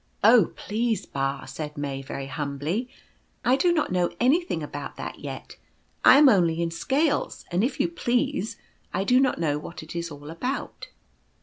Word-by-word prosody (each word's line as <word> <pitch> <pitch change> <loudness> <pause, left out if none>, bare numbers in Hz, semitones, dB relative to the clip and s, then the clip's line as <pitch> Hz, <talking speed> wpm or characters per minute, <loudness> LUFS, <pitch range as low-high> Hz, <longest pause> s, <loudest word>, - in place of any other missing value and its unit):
"Oh, 225 -3 +6
please, 220 -1 -1
Ba," 135 0 -2
said 150 +2 -6
May, 140 -2 -3
very 135 0 -6
humbly, 145 - -3 0.6
"I 250 - +5
do 350 +5 +3
not 320 - +1
know 180 -1 +2
anything 315 +9 +2
about - - -6
that - - -7
yet. - - -8 0.5
I 250 - +9
am 295 0 +8
only 175 -8 +4
in 170 -1 0
scales, 280 - 0
and, 180 +4 +1
if 255 +2 -1
you - - +3
please, 250 - -1 0.4
I - - +1
do 250 +5 +4
not 265 -1 +2
know 150 -3 0
what 165 +2 -8
it 155 - -10
is 170 0 -3
all 145 0 -9
about." 250 +12 -4
185 Hz, 175 wpm, -26 LUFS, -, 0.6 s, I